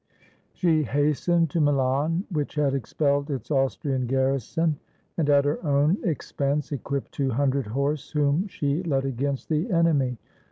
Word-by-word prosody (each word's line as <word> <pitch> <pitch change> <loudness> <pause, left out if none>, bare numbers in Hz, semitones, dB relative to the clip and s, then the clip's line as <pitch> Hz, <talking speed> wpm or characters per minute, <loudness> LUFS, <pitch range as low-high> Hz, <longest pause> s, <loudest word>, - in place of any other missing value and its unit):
She 165 -4 +2
hastened 150 +4 +1
to 165 - +1
Milan, 145 +4 +1
which 150 -3 -2
had 145 -2 +1
expelled 140 +2 0
its 135 -1 -4
Austrian 135 -1 0
garrison, 135 +4 0 0.4
and 155 -3 0
at 140 -1 +5
her 145 +4 -1
own 150 +5 +2
expense 145 -2 -2
equipped 140 0 -3
two 135 -2 -1
hundred 135 0 0
horse, 140 +5 -2
whom 150 +5 +1
she 145 -3 -1
led 140 -6 0
against 135 +1 -2
the 160 +7 0
enemy. 155 - +2
145 Hz, 145 wpm, -25 LUFS, 135-155 Hz, 0.4 s, at